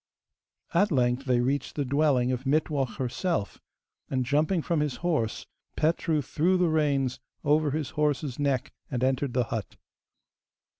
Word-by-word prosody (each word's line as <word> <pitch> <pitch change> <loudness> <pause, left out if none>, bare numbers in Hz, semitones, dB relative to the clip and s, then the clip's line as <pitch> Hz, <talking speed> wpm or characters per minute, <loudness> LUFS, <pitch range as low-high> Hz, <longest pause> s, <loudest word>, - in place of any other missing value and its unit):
At 200 +4 +3
length 125 -1 +1
they 125 -2 +2
reached 135 +3 -1
the 145 - -1
dwelling 135 -2 +2
of 130 +1 -3
Mittwoch 140 -6 0
herself, 130 - -2 0.5
and, 130 -2 0
jumping 155 +6 +1
from 170 -3 0
his 150 -3 -1
horse, 150 -11 0 0.3
Petru 155 -1 +1
threw 170 +8 +1
the 180 -2 +2
reins 140 -5 +1 0.2
over 150 +1 +3
his 150 +1 -2
horse's 150 -3 -1
neck 140 -1 0 0.2
and 125 -3 -2
entered 130 0 +1
the 125 - +3
hut. 110 -4 -4
140 Hz, 145 wpm, -27 LUFS, 130-155 Hz, 0.5 s, At